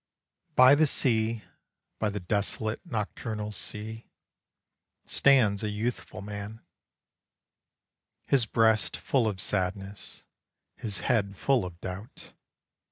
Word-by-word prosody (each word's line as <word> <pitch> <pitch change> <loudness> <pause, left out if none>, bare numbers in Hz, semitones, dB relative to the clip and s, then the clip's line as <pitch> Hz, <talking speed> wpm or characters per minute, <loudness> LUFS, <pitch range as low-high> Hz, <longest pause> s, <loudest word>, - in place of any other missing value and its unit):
By 130 +2 +8
the 155 +2 +5
sea, 115 -4 +1 0.6
by 110 - +1
the 105 0 -3
desolate 105 +3 -2
nocturnal 110 - -4
sea, 110 +2 -4 1.0
Stands 115 -8 +4
a 105 - -1
youthful 105 -2 -3
man, 105 +2 -7 1.6
His 130 -5 +2
breast 110 -1 +3
full 125 -5 +1
of 100 -3 -2
sadness, 95 +2 -3 0.5
his 105 -4 -4
head 100 -6 +1
full 135 -1 +2
of 90 -1 -8
doubt. 95 +4 -8
110 Hz, 100 wpm, -28 LUFS, 100-115 Hz, 1.6 s, By